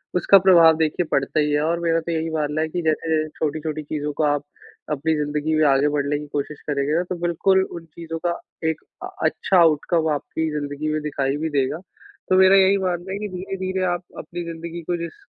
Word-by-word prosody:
उसका 180 +3 +6
प्रभाव 170 -4 +6
देखिए 160 +2 0
पड़ता 135 +3 +1
ही 150 0 +1
है 145 0 +2
और 170 +2 0
मेरा 165 -1 +1
तो 170 - -4
यही 165 0 -1
मानना 155 -1 -1
है 160 - 0
कि 175 +2 -3
जैसे-जैसे 155 -1 0
छोटी-छोटी 155 0 -2
चीज़ों 150 0 -3
को 155 - -1
आप 145 -1 +1 0.5
अपनी 155 +2 0
ज़िंदगी 150 +1 -1
में 155 - +4
आगे 140 +1 +3
बढ़ने 145 0 0
की 150 - -7
कोशिश 145 0 -3
करेंगे 140 0 0
ना 175 - +2
तो 185 - -2
बिल्कुल 175 +3 +2
उन 170 -1 -8
चीज़ों 165 +1 -7
का 170 - -2 0.3
एक 160 - -3 0.2
अ - - -4 0.2
अच्छा 190 - +1
आउटकम 160 0 +3
आपकी 160 +2 -3
ज़िंदगी 145 +1 -4
में 155 - -1
दिखाई 140 -2 -1
भी 160 +2 -2
देगा। 140 0 0 0.5
तो 185 - +4
मेरा 190 +1 +7
यही 195 0 +5
मानना 180 -1 -2
है - - -3
कि, 210 - -3
धीरे-धीरे 190 0 -4
आप 175 +1 -4
अपनी 175 0 -6
ज़िंदगी 170 +1 -6
को 175 +2 -2
जिस 170 - -8
160 Hz, 210 wpm, -22 LUFS, 150-175 Hz, 0.5 s, मेरा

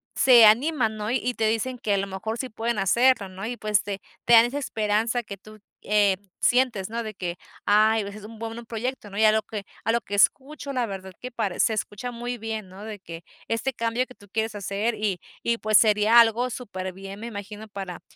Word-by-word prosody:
se 240 -4 +7
animan, 235 0 +3
¿no? 210 0 -4
Y 250 0 0
te 225 -2 0
dicen: 230 +3 -1
"Que 205 -3 +1
a - - +1
lo 195 - -1
mejor, 200 +4 -4
sí 260 - -3
pueden 230 +1 -2
hacerlo", 215 +1 +3
¿no?, 190 +3 -6
y 240 +1 -4
pues, 210 -2 +1
te 200 -1 -5 0.3
te 240 - +4
dan 230 0 +9
esa 265 +4 -3
esperanza 225 -1 0
que 200 -2 -8
tú, 215 +2 -15 0.2
eh, 205 -2 +3 0.2
sientes, 240 -6 +2
¿no?, 235 - -2
de 215 -2 -6
que: 180 -2 -4 0.3
"Ay, 215 +1 +4
hubiese 200 +1 -7
sido 210 +1 -10
un 225 - -12
buen 225 0 -6
un 235 - -11
proyecto", 235 -1 -4
¿no? 200 - -8
Y 220 - +3
a 215 - +7
lo 220 0 +2
que 210 -1 -7 0.2
a 225 - +1
lo 235 - +1
que 205 - -10
escucho, 275 +7 +1
la 250 -3 0
verdad 190 -2 -7
que 250 0 -7
pare 200 -5 -3
se 220 - +3
escucha 215 +3 -4
muy 240 +1 -5
bien, 220 -3 -5
¿no?, 190 +2 -11
de 210 -2 -7
que 165 -2 -10 0.2
este 240 +4 -1
cambio 230 +2 -1
que 255 - -15
tú 205 - -19
quieres 220 0 -1
hacer. 205 +3 -2
Y 205 -5 -2 0.2
y 235 0 0
pues, 215 -2 +4
sería 215 +1 +5
algo 235 +2 +4
superbién, 195 -4 -7
me 225 - -7
imagino 210 0 -8
para 195 -3 -7
220 Hz, 230 wpm, -25 LUFS, 200-235 Hz, 0.3 s, dan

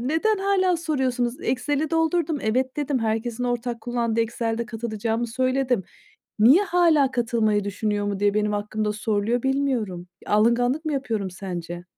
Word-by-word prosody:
Neden 325 - +1
hâlâ 385 -2 +2
soruyorsunuz? 260 -7 -1
Excel'i 290 +4 -1
doldurdum, 325 -1 +1
"Evet." 255 +4 0
dedim. 290 -2 0
Herkesin 225 +2 -2
ortak 245 -1 -2
kullandığı 235 -2 -1
Excel'de 230 0 -2
katılacağımı 225 0 -2
söyledim. 255 -3 0 0.5
Niye 265 - +6
hâlâ 330 -7 +3
"Katılmayı 225 -4 +1
düşünüyor 205 +1 -2
mu?" 200 -1 -2
diye 205 0 +2
benim 210 0 +1
hakkımda 210 +1 -2
soruluyor, 215 +2 -1
bilmiyorum. 255 -10 -1 0.2
Alınganlık 245 +7 +2
mı 310 - -1
yapıyorum 225 -8 -2
sence? 175 -2 -6
240 Hz, 135 wpm, -24 LUFS, 215-275 Hz, 0.5 s, Niye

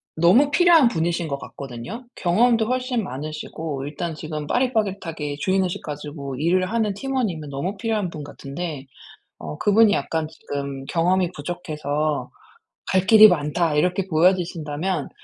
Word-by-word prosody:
너무 190 - +5
필요한 335 -4 +6
분이신 170 -2 -1
것 140 -2 -3
같거든요. 140 - -8
경험도 225 +5 +3
훨씬 250 -1 -1
많으시고 155 -1 -5
일단 155 +3 -4
지금 155 -1 -5
빠릿빠릿하게 195 - -1
주인의식 185 +1 0
가지고 145 -2 -6
일을 180 +5 +2
하는 220 -3 0
팀원이면 205 - -2
너무 175 +9 -3
필요한 215 -3 -1
분 155 -3 -7
같은데 145 0 -6 0.5
어 75 -2 -7
그분이 215 +1 +4
약간 160 -2 -1
지금 140 -3 -6
경험이 175 +4 +1
부족해서 150 -2 -3 0.6
'갈 190 0 +2
길이 215 +1 +9
많다.' 160 -2 +1
이렇게 180 +5 +1
보여지신다면 170 -2 0
170 Hz, 335 characters per minute, -23 LUFS, 150-200 Hz, 0.6 s, 길이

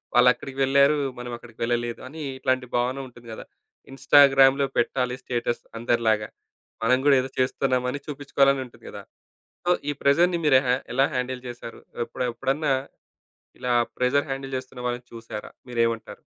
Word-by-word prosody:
వాళ్ళు 125 +1 +7
అక్కడికి 135 0 -10
వెళ్లారు, 140 +2 +4 0.2
మనం 125 0 -6
అక్కడికి 115 -1 -16
వెళ్ళలేదు 120 0 -1
అని 155 +3 -9 0.2
ఇట్లాంటి 130 -1 0
భావన 125 +2 0
ఉంటుంది 120 -1 -16
గదా! - - -9 0.5
ఇన్‌స్టాగ్రామ్‌లో 135 0 +5
పెట్టాలి 125 +1 0
స్టేటస్ 120 -1 -2 0.2
అందరిలాగా. 115 -3 +1 0.6
మనం 125 +3 +4
గూడా 145 - +6
ఏదో 130 - -5
జేస్తున్నామని 130 +1 0
చూపించుకోవాలని 140 -1 +1
ఉంటుంది 125 - -18
గదా! - - -9 0.6
సో 175 - +3 0.2
ఈ - - +2
ప్రెషర్‌ని 170 +5 +3
మీరు 135 -3 +6
హ - - 0 0.2
ఎలా 135 +2 +4
హ్యాండిల్ 125 0 -3
జేసారు? 120 -1 -8 0.3
ఎప్పుడ్ 125 - -4
ఎప్పుడన్నా 135 +4 0 0.9
ఇలా 125 - -2 0.3
ప్రెషర్ 135 +4 +1
హ్యాండిల్ 135 0 -5
జేస్తున్న 130 -1 -9
వాళ్ళని 120 0 -4
చూసారా? 115 -2 -8 0.2
మీరేమంటారు? 115 -2 -1
130 Hz, 145 wpm, -25 LUFS, 120-135 Hz, 0.9 s, వాళ్ళు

